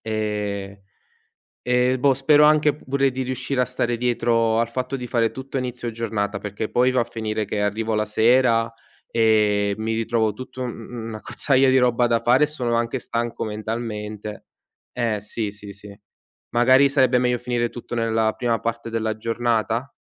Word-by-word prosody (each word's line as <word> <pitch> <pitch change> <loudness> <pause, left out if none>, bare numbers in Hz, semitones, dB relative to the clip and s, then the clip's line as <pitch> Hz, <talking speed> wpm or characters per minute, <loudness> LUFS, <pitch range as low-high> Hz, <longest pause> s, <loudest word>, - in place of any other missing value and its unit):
Ehm, 105 -2 -3 0.9
eh, 125 +1 +2
boh, 135 +1 +3
spero 145 +3 +4
anche 150 -1 +4
pure 140 -2 0
di 130 0 -3
riuscire 130 +1 -2
a - - +4
stare 120 -1 -2
dietro 115 -2 +1
al 115 - 0
fatto 130 +3 -3
di 125 -1 -6
fare 115 -2 +1
tutto 130 +1 -7
a - - +1
inizio 125 -1 -4
giornata 105 -3 -2
perché 105 +2 -4
poi 125 +1 +3
va 130 - +2
a - - +1
finire 110 -2 -3
che 105 +1 -3
arrivo 110 +2 -1
la 105 - +1
sera 115 +1 +3 0.4
e 105 -3 +2
mi 110 +1 -2
ritrovo 110 -1 0
tutto 130 +2 -7
mhmm, 115 -1 -7
un'accozzaglia 130 +4 +1
di 130 - +5
roba 125 -1 +3
da 115 -1 +2
fare 130 +5 +4
e - - +1
sono 125 -6 -2
anche 120 +2 -1
stanco 115 0 -3
mentalmente. 105 -1 -5 0.5
Eh 110 -3 -1
sì, 105 +1 -4
sì, 105 -1 -10
sì, 100 0 -13 0.6
magari 130 +3 +5
sarebbe 130 -3 +3
meglio 125 0 +1
finire 120 -1 -1
tutto 120 0 -7
nella 110 -1 +1
prima 120 -2 0
parte 115 0 -4
della 110 -1 -2
giornata? 115 +2 -1
115 Hz, 170 wpm, -22 LUFS, 110-125 Hz, 0.9 s, di